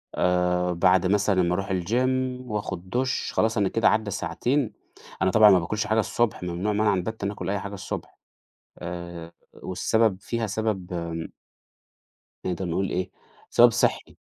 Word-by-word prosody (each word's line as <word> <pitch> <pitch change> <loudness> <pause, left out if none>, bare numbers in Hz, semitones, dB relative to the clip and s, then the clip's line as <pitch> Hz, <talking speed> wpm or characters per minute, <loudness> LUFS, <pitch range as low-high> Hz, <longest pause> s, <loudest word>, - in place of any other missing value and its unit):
آآ 90 0 +1
بعد 90 +1 +3
مثلًا 100 -1 +2
أما 90 0 +1
أروح 95 +1 -3
الgym 125 +7 0
وآخد 100 -5 -4
دُش 125 +4 -1
خلاص 110 +1 +1
أنا 100 -2 +2
كده 115 +2 +2
عدى 110 -2 0
ساعتين. 120 - -1 0.5
أنا 95 -1 +3
طبعًا 110 -1 +7
مباكلش 95 +4 +1
حاجة 110 +1 +2
الصبح 110 -3 0
ممنوع 90 +4 -2
منعًا 105 -1 +2
باتًا 100 +2 -3
آكل 95 -2 -5
أي 100 - 0
حاجة 100 +1 -7
الصبح. 95 - -6 0.6
آآ 85 -1 -7 0.2
والسبب 110 +2 0
فيها 115 +1 -2
سبب 100 -4 -2
آمم 85 -1 -4 1.2
نقدر 90 +1 -2
نقول 90 +3 -1
إيه، 90 +1 -2 0.4
سبب 120 0 +6
صحي. - - 0
95 Hz, 145 wpm, -25 LUFS, 90-110 Hz, 1.2 s, طبعًا